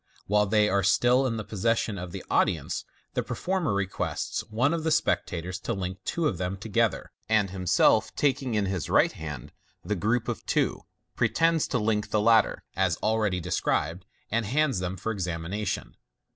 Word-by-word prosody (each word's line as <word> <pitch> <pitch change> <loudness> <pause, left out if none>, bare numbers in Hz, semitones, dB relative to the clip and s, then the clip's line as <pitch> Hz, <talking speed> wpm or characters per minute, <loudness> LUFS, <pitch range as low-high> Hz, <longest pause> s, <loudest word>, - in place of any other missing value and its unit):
While 105 +1 +2
they 105 +1 +3
are 100 -1 +2
still 120 +7 +3
in 115 -2 -2
the 110 - -3
posses 110 +3 0
sion 105 -4 -2
of 90 -1 -6
the 95 0 -7
audience, - - 0 0.3
the - - 0
performer 185 - -1
requests 100 -1 -2
one 125 +8 +2
of 165 -2 -2
the 160 - +1
spectators 90 - 0
to - - -3
link 95 -1 -4
two 170 -2 0
of 90 - -2
them 90 +1 -2
together, 110 +2 0 0.2
and 105 -4 +2
himself 90 -2 +3
taking 135 -4 +1
in 105 -2 +1
his 95 -3 -3
right - - +4
hand 75 -5 -7 0.3
the 105 - 0
group 110 +6 0
of - - -3
two, - - 0 0.3
pretends 165 -1 +2
to 125 - 0
link 105 -2 0
the 105 - +1
latter, 110 +1 +3
as 95 -4 +1
already 105 -4 +1
described, 85 0 -1 0.3
and 115 -2 0
hands 135 -3 +1
them 90 +1 -3
for 110 +6 -3
examination. 90 +1 -3
105 Hz, 175 wpm, -27 LUFS, 95-115 Hz, 0.3 s, right